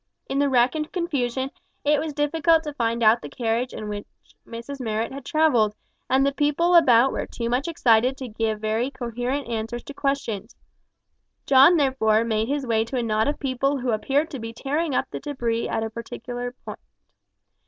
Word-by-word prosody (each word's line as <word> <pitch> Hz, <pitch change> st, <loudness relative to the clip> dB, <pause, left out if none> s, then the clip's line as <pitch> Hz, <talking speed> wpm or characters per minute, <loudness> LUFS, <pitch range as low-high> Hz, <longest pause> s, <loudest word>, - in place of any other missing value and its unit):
In 275 Hz, -, -1 dB
the 285 Hz, 0 st, +3 dB
wreck 250 Hz, -1 st, +3 dB
and 310 Hz, -1 st, -4 dB
confusion, 270 Hz, -, -2 dB, 0.3 s
it 295 Hz, 0 st, +3 dB
was 310 Hz, +1 st, -3 dB
difficult 315 Hz, +2 st, +2 dB
to 300 Hz, -2 st, -5 dB
find 235 Hz, -3 st, -1 dB
out 225 Hz, +2 st, +5 dB
the -, -, -8 dB
carriage, 235 Hz, +1 st, -1 dB
in 215 Hz, -, -6 dB
which 205 Hz, -1 st, -5 dB, 0.4 s
Mrs 235 Hz, +5 st, -7 dB
Marrot 225 Hz, -2 st, -2 dB
had 275 Hz, 0 st, -7 dB
travelled, 250 Hz, -9 st, +2 dB, 0.3 s
and 265 Hz, +1 st, +3 dB
the 280 Hz, -, +2 dB
people 295 Hz, +5 st, +1 dB
about 265 Hz, -6 st, +6 dB
were -, -, -3 dB
too 235 Hz, -1 st, -4 dB
much 255 Hz, +5 st, 0 dB
excited 255 Hz, -5 st, +3 dB
to 260 Hz, -, -6 dB
give 220 Hz, -1 st, -2 dB
very 220 Hz, +4 st, -1 dB
coherent 250 Hz, +1 st, -3 dB
answers 230 Hz, +1 st, -4 dB
to 285 Hz, -, -9 dB
questions. 255 Hz, -7 st, -3 dB, 0.9 s
John, 275 Hz, +6 st, +7 dB
therefore, 245 Hz, -6 st, +2 dB
made 220 Hz, -1 st, 0 dB
his 280 Hz, 0 st, -1 dB
way 225 Hz, -2 st, +2 dB
to 255 Hz, +3 st, -4 dB
a 245 Hz, -, 0 dB
knot 220 Hz, -1 st, +1 dB
of 290 Hz, -, -1 dB
people 275 Hz, +1 st, 0 dB
who 250 Hz, -2 st, -1 dB
appeared 280 Hz, +8 st, 0 dB
to 275 Hz, -, -5 dB
be 225 Hz, 0 st, -6 dB
tearing 285 Hz, +5 st, -2 dB
up -, -, +1 dB
the -, -, -5 dB
debris 240 Hz, -6 st, -2 dB
at 225 Hz, -, -1 dB
a 225 Hz, -, -3 dB
particular 245 Hz, +2 st, -6 dB
spot. 250 Hz, -, -10 dB
255 Hz, 190 wpm, -24 LUFS, 230-285 Hz, 0.9 s, John